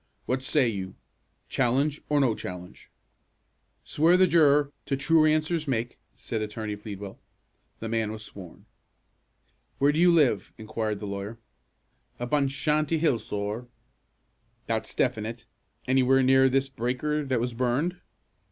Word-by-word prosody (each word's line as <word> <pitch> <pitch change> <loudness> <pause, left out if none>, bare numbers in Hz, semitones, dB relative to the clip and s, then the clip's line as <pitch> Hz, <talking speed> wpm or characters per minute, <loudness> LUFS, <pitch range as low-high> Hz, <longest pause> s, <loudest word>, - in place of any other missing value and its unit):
What 130 +1 -1
say 135 -1 +2
you, 95 -4 -4 0.5
challenge, 140 +5 +1
or 150 -1 +3
no 130 -5 +3
challenge?" 90 -3 -9 0.9
"Swear 165 +4 +3
the 185 - +6
juror 150 -4 +4 0.2
to 135 - 0
'true 155 +3 +4
answers 155 +1 +1
make,'" 120 -2 -2 0.2
said 110 -2 -4
Attorney 105 0 -4
Pleadwell. 100 -2 -8 0.6
The 115 - -3
man 110 -1 -1
was 110 0 -6
sworn. 95 -5 -11 1.1
"Where 140 +1 +4
do 150 - -1
you 175 0 +6
live?" 140 - +2
inquired 110 -1 -3
the - - -4
lawyer. 100 +3 -5 0.8
"Up 120 +2 -5
on 145 -2 +3
Shanty 150 +3 0
Hill, 150 -7 +2
sorr." 105 +3 -4 1.0
"That's - - -3
definite. 110 +2 -1 0.4
Anywhere 130 0 +4
near 130 +1 +5
this 135 +1 +1
breaker 135 +4 -2
that 130 -3 0
was 120 +1 -2
burned?" 130 +9 0
130 Hz, 135 wpm, -27 LUFS, 110-150 Hz, 1.1 s, the